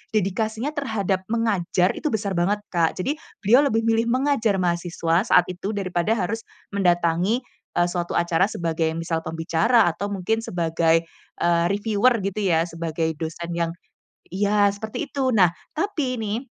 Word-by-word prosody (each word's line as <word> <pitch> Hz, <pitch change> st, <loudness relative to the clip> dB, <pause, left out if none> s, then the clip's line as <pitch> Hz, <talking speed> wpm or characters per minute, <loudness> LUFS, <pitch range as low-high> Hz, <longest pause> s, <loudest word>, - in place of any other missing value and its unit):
dedikasinya 220 Hz, +7 st, -1 dB
terhadap 205 Hz, -, -1 dB
mengajar 195 Hz, -5 st, +1 dB
itu 305 Hz, -, -2 dB
besar 205 Hz, -2 st, -1 dB
banget, 200 Hz, +4 st, +1 dB
Kak. 170 Hz, -2 st, +1 dB
Jadi 290 Hz, +9 st, -1 dB, 0.3 s
beliau 245 Hz, +8 st, +5 dB
lebih 225 Hz, -2 st, +1 dB
memilih 225 Hz, +1 st, +2 dB
mengajar 255 Hz, -5 st, +2 dB
mahasiswa 170 Hz, +1 st, 0 dB
saat 180 Hz, -1 st, +6 dB
itu, 190 Hz, +4 st, -4 dB
daripada 185 Hz, +1 st, 0 dB
harus 210 Hz, +2 st, -2 dB, 0.4 s
mendatangi, 175 Hz, +4 st, +2 dB, 0.4 s
eee, 175 Hz, 0 st, +4 dB
suatu 175 Hz, -1 st, -3 dB
acara 170 Hz, +2 st, +2 dB
sebagai, 165 Hz, -1 st, -1 dB
misal, 165 Hz, 0 st, -1 dB
pembicara 165 Hz, +7 st, +2 dB
atau 200 Hz, +5 st, -4 dB
mungkin 200 Hz, +4 st, 0 dB
sebagai, 165 Hz, -2 st, +1 dB, 0.4 s
eee, 170 Hz, 0 st, +3 dB
reviewer 215 Hz, +4 st, +2 dB
gitu 200 Hz, +1 st, -2 dB
ya, 165 Hz, -2 st, +3 dB
sebagai 165 Hz, -1 st, -2 dB
dosen 170 Hz, +1 st, -5 dB
yang 165 Hz, -1 st, 0 dB, 0.6 s
iya 205 Hz, +1 st, +3 dB
seperti 220 Hz, +8 st, -5 dB
itu. 265 Hz, -2 st, 0 dB
Nah, 185 Hz, -6 st, +5 dB, 0.2 s
tapi 305 Hz, -7 st, -1 dB
nih, 220 Hz, +5 st, -3 dB
190 Hz, 145 wpm, -23 LUFS, 170-225 Hz, 0.6 s, saat